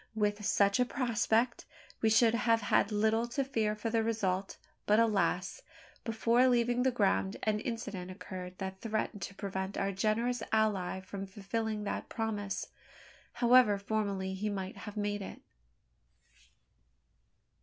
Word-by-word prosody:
With 210 -1 0
such 200 +1 +3
a 250 - +4
prospect, 235 -1 0 0.4
we 220 - +4
should 225 +1 +5
have 230 -1 +2
had 205 0 +2
little 220 +2 +2
to 275 +4 -1
fear 220 -5 0
for 220 +1 -3
the 225 0 +2
result; 195 -4 -1 0.3
but 210 +2 +5
alas! 200 -5 +1 0.4
before 230 +2 +3
leaving 240 0 +2
the 260 - +3
ground, 200 -3 +1
an 215 -1 +1
incident 210 -6 -5
occurred 185 -1 -8
that 190 -1 -6
threatened 215 -2 -2
to 195 +3 -6
prevent 190 0 -4
our 195 0 0
generous 220 +5 0
ally 200 -4 +1
from 195 +1 -7
fulfilling 210 +2 -3
that 205 - -4
promise, 210 -3 -3 0.7
however 240 -4 +5
formally 200 -2 -2
he 205 +3 -2
might 190 -2 -4
have 210 0 -9
made 205 0 -1
it. 195 - -8
210 Hz, 140 wpm, -32 LUFS, 195-230 Hz, 0.7 s, should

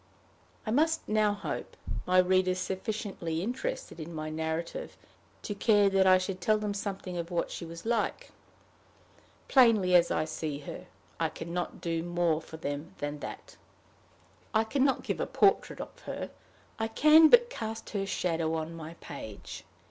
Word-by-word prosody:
I 215 - -2
must 320 +6 +2
now 215 -1 +3
hope 200 - -5 0.3
my 185 0 +3
readers 185 0 +4
sufficiently 190 -4 -3
interested 265 - -4
in 160 +1 -7
my 155 0 -4
narrative 160 - -3 0.5
to 205 - -3
care 205 -1 +4
that 190 -1 +4
I 185 0 +8
should 185 0 -4
tell 215 +3 +3
them 210 -1 -2
something 195 -3 -4
of 170 0 -4
what 175 -2 -1
she 170 - -5
was 165 +2 -9
like. 235 - -1 1.2
Plainly 225 -8 +5
as 175 -1 +6
I 155 - +1
see 155 -2 -4
her, - - -8 0.3
I - - +1
can 170 +1 -7
not 175 0 -3
do 165 -1 -1
more 170 -2 +1
for 160 - -10
them 145 +1 -5
than 145 0 -4
that. - - -8 1.0
I 220 - +5
can 260 +5 0
not 270 -1 +2
give - - -2
a - - -1
portrait 395 - +2
of - - -8
her; - - -4 0.5
I 225 - 0
can 305 +7 +7
but 485 0 +6
cast 220 - -5
her 195 -2 -2
shadow 165 -4 0
on 160 +1 -3
my 165 0 -8
page. 110 -9 -8
185 Hz, 165 wpm, -30 LUFS, 165-220 Hz, 1.2 s, I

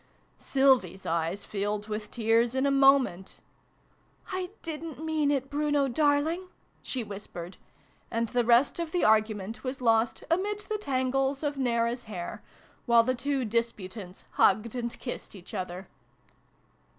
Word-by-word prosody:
Sylvie 270 -4 +3
s 190 - -16
eyes 170 +4 -1
filled 205 +1 -2
with 210 0 -4
tears 230 +1 +2
in 265 +1 +2
a 280 - +3
moment. 270 -9 +3 0.4
" - - -21
I 370 -1 -2
didn't 320 -2 -6
mean 310 -2 +1
it, 275 -2 0
Bruno, 290 -1 +1
darling 300 +6 +1 0.2
/" - - -38
she 255 -3 -3
whis 205 -1 -8
pered; 175 +1 -8 0.5
and 230 0 0
the 245 +2 +1
rest 240 +7 +4
of 335 -2 -3
the 355 - +1
argument 215 0 +2
was 260 0 -4
lost 225 -1 +2
'amid 405 +4 +1
the 425 0 -3
tangles 270 -2 0
of 290 -1 0
Nea^ra's 240 -2 0
hair,' 180 -5 -6 0.5
while 235 -1 +6
the 255 +2 +1
two 265 +1 -1
disputants 210 -4 -3
hugged 215 +3 +3
and 240 -2 -4
kissed 245 - -6
each 185 -2 -12
other. 185 +1 -5
245 Hz, 150 wpm, -28 LUFS, 215-285 Hz, 0.5 s, while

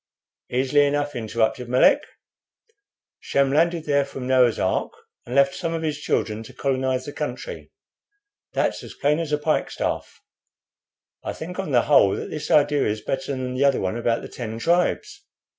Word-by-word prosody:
"Easily 135 +3 +3
enough," 145 0 -1
interrupted 115 +1 -1
Melick 125 +1 +5 1.2
"Shem 140 -1 +1
landed 165 +2 +2
there 140 -1 +2
from 135 -2 -7
Noah's 125 -3 +4
ark, - - 0 0.4
and 125 - -4
left 140 0 +4
some 165 +1 -3
of 165 - -3
his 150 -2 -2
children 110 -6 -1
to 115 - -12
colonize 130 -1 -1
the 145 - -7
country. - - -6 0.8
That's - - 0
as - - -10
plain 150 +2 +1
as 165 -3 -3
a 150 - +2
pikestaff. 150 +1 -2 1.0
I - - -3
think, 180 +4 -7
on 190 - -3
the 125 -4 +3
whole, 135 -9 +5
that - - -6
this 155 -1 -5
idea 145 -1 +3
is 105 0 -2
better 140 +8 -3
than 130 -1 -3
the 130 +2 0
other 140 -1 +3
one 95 +2 -2
about 115 0 0
the - - -6
Ten 115 -2 -6
Tribes. 170 +9 0
140 Hz, 170 wpm, -23 LUFS, 125-150 Hz, 1.2 s, Melick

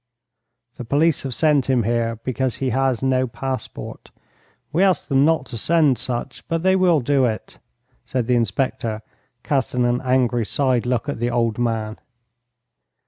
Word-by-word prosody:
"The - - -6
police 145 +6 +1
have 135 -2 -4
sent 150 -4 +2
him 125 -3 +3
here 115 +1 0
because 130 -1 -1
he 130 -2 -2
has 130 0 0
no 130 -1 +2
passport. 130 +2 -6 0.6
We 170 - +2
ask 190 -2 +2
them 140 -1 +3
not 160 +1 +2
to 115 -3 -5
send 155 -2 +3
such, 125 +1 -3
but 165 0 -2
they 190 0 +4
will 180 -5 +3
do 135 +1 +2
it," 110 -3 -4 0.4
said 125 -3 -2
the 125 - +1
inspector, 115 -1 -1 0.4
casting 130 -3 0
an 120 +1 +1
angry 125 -2 +1
side 125 +1 0
look 125 +2 -1
at 145 - -3
the 120 +1 0
old 115 -2 0
man. 110 -2 -2
130 Hz, 160 wpm, -21 LUFS, 120-140 Hz, 0.6 s, they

